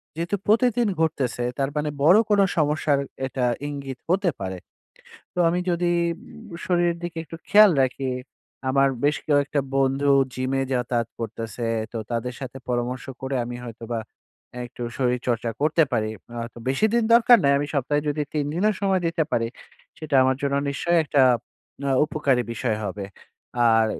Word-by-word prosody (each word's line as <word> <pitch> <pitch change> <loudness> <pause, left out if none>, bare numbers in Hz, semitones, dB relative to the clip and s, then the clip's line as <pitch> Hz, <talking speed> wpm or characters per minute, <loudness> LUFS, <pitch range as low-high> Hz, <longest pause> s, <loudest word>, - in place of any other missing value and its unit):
যেহেতু 170 +5 -1
প্রতিদিন 235 +1 +3
ঘটতেছে, 130 -6 0 0.2
তার 135 0 +1
মানে 150 0 0
বড় 175 +7 +7
কোনো 205 -1 +5
সমস্যার 150 -2 +2 0.3
এটা 130 -1 -1 0.2
ইঙ্গিত 140 -3 -6
হতে 190 0 +2
পারে। 95 -1 -4 0.8
তো - - -4
আমি 175 +1 0
যদি 175 0 +1 0.2
উম 220 +2 -13
শরীরের 175 -1 +1
দিকে 170 -1 -5
একটু 165 +1 -9
খেয়াল 210 -1 +8
রাখি, 130 +1 -2 0.6
আমার 135 +1 +4 0.2
বেশ 150 - +2
কয়েকটা 145 -1 +2 0.2
বন্ধু 135 +1 +2 0.2
জিমে 130 +1 -1
যাতায়াত 120 -2 -1
করতেছে। 115 +1 -4 0.3
তো - - -3
তাদের 120 +1 -2
সাথে 130 -1 -7
পরামর্শ 125 +1 -2 0.2
করে 135 0 -3
আমি 120 0 -6
হয়তোবা 115 0 -5 0.6
এ - - -5
একটু 120 0 -8
শরীরচর্চা 125 -2 0
করতে 155 +2 +4
পারি। 110 -1 +1 0.2
আ - - -8
হয়তো 115 +1 -8
বেশি 135 +11 +2
দিন 235 - +3
দরকার 235 +1 +7
নাই। 140 - +4
আমি 145 - -2
সপ্তাহে 145 +2 +1
যদি 150 +1 -1
৩ 150 -2 0
দিনও 205 +6 +2
সময় 190 -2 +2
দিতে 165 -1 0
পারি, 115 0 +1 0.5
সেটা 155 -3 -2
আমার 130 0 +2
জন্য 140 0 0
নিশ্চয়ই 170 +5 +1
একটা 145 -2 +2 0.7
আ - - +2
উপকারী 135 -5 +1
বিষয় 115 -2 -1
হবে। 100 0 -4 0.6
আর 110 0 +4
140 Hz, 160 wpm, -24 LUFS, 125-165 Hz, 0.8 s, খেয়াল